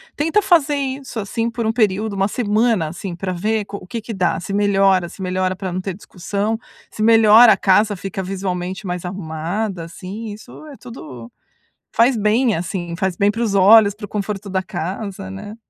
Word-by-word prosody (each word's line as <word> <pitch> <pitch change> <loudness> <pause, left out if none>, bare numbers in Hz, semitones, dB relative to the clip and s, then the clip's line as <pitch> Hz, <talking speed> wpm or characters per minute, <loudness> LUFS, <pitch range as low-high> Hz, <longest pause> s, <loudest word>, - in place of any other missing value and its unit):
Tenta 325 +8 +2
fazer 320 -7 +3
isso, 270 -2 -4
assim, 225 +3 -2
por 235 -1 -4
um 220 - +2
período, 215 -2 0
uma 195 0 +1
semana, 215 -5 +1
assim, 180 +2 -6
pra 185 +2 -4
ver 210 +5 -1
co 200 0 -7
o 185 - -13
que 230 - -5
que 225 +1 -7
dá, 185 -3 0
se 195 - -5
melhora, 195 -3 +3
se 190 - -12
melhora 185 0 -1
pra 185 0 -5
não 180 - -2
ter 190 0 -4
discussão, 205 +3 -3 0.3
se - - -7
melhora, 225 +1 +7
a - - -2
casa 205 +2 +3
fica 195 0 -5
visualmente 185 0 -4
mais 180 -1 -4
arrumada, 180 +2 -4
assim, 200 +6 -7
isso 215 +8 -12
é 290 - -10
tudo 130 - -10 0.6
faz 235 +2 +4
bem, 220 +2 +2
assim, 175 0 -4
faz 190 -1 -1
bem 200 +3 +2
pros 220 -2 -1
olhos, 205 +2 +7
pro 210 -1 -8
conforto 205 0 -4
da 190 0 0
casa, 190 +2 -5
né? 205 +2 -8
200 Hz, 185 wpm, -19 LUFS, 185-220 Hz, 0.6 s, melhora